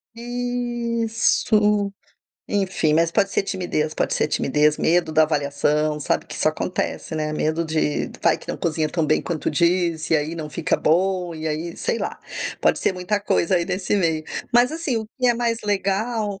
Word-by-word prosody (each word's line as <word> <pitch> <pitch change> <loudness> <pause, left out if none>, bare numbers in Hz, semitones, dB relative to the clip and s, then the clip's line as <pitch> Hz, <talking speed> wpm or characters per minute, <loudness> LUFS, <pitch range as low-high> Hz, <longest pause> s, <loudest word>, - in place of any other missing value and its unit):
Isso, 235 -4 0 0.6
enfim, 190 -6 +1
mas 165 +1 +3
pode 200 -1 +3
ser - - +1
timidez 175 -6 -2
pode - - -1
ser - - +1
timidez, 150 +2 +2
medo 165 -1 +2
da 155 0 +5
avaliação, 150 0 0
sabe. - - 0
Que - - -9
isso - - +2
acontece, - - -3
né. 155 0 -2
Medo 155 +2 0
de: 155 -2 0
vai - - +3
que - - -16
não - - -2
cozinha 155 -2 -1
tão 165 0 0
bem 155 - +2
quanto 165 -3 -2
diz, 170 0 +1
e 160 - +5
aí 155 +3 -2
não 155 -2 -5
fica 160 +2 -1
bom, 180 +1 +1
e 160 0 -5
aí, 160 +2 -3
sei 230 - -1
lá, - - -4 0.4
pode - - +3
ser 190 - 0
muita 185 +3 -1
coisa 185 -2 +2
aí 170 - 0
nesse 190 +2 -1
meio. 160 -5 +1 0.3
Mas 245 +4 +4
assim, 315 -7 -2
o 220 -1 -3
que 250 - +2
é 240 - +4
mais 230 -1 0
legal 205 +1 -1
175 Hz, 185 wpm, -22 LUFS, 155-210 Hz, 0.6 s, da